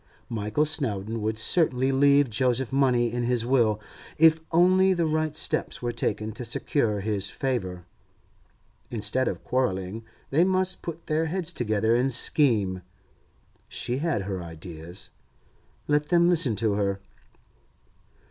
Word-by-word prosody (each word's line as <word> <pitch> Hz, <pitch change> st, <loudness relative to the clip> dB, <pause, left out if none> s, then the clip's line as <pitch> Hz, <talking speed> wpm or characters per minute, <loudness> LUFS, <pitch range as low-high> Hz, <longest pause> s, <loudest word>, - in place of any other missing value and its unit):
Michael 110 Hz, +6 st, 0 dB
Snowdon 115 Hz, -8 st, -2 dB
would 110 Hz, +1 st, -2 dB
certainly 130 Hz, +1 st, +2 dB
leave 140 Hz, +1 st, +4 dB
Joseph 125 Hz, +3 st, 0 dB
money 125 Hz, -4 st, +2 dB
in 120 Hz, -, -1 dB
his 120 Hz, -1 st, +1 dB
will, 120 Hz, -5 st, +2 dB, 0.4 s
if 160 Hz, 0 st, +5 dB
only 185 Hz, +3 st, +4 dB
the 170 Hz, -1 st, +1 dB
right 155 Hz, -1 st, -1 dB
steps -, -, -1 dB
were 120 Hz, -, -1 dB
taken 110 Hz, -2 st, -2 dB
to 120 Hz, -, -7 dB
secure 115 Hz, -2 st, -1 dB
his 105 Hz, -1 st, -1 dB
favour. 95 Hz, -10 st, -3 dB, 1.0 s
Instead 115 Hz, +3 st, 0 dB
of -, -, -4 dB
quarrelling, 110 Hz, -4 st, -2 dB, 0.3 s
they 155 Hz, +5 st, +4 dB
must 185 Hz, 0 st, 0 dB
put 170 Hz, -1 st, -7 dB
their 155 Hz, +1 st, 0 dB
heads 180 Hz, +1 st, -1 dB
together 110 Hz, -2 st, +1 dB
and 130 Hz, +3 st, +1 dB
scheme. 110 Hz, -8 st, +2 dB, 0.9 s
She 120 Hz, +2 st, -3 dB
had 150 Hz, -9 st, -1 dB
her 95 Hz, -2 st, -4 dB
ideas; 85 Hz, +1 st, -9 dB, 0.8 s
let 150 Hz, 0 st, +1 dB
them 170 Hz, 0 st, +4 dB
listen 160 Hz, -10 st, +2 dB
to 110 Hz, 0 st, 0 dB
her. 100 Hz, -1 st, -1 dB
125 Hz, 135 wpm, -26 LUFS, 105-150 Hz, 1.0 s, if